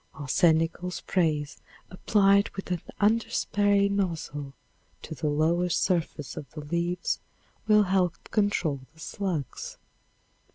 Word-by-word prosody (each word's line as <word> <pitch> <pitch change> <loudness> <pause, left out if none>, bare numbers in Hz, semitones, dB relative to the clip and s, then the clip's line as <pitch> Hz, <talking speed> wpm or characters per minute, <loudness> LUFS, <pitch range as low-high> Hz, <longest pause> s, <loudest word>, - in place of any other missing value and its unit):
Arsenical 160 +4 +2
sprays 155 -5 -1 0.3
applied 200 +1 +3
with 195 -1 -6
an 175 -2 -1 0.2
underspray 205 -2 +2
nozzle 165 -8 -2 0.5
to - - -6
the 150 +1 -3
lower 165 +4 +2
surface 165 -4 -1
of 140 - -7
the 155 - -6
leaves 170 +3 -1 0.5
will 210 -1 +6
help 185 -3 +1
control 195 -9 +1 0.2
the - - -20
slugs. 165 - -4
175 Hz, 110 wpm, -27 LUFS, 155-200 Hz, 0.5 s, will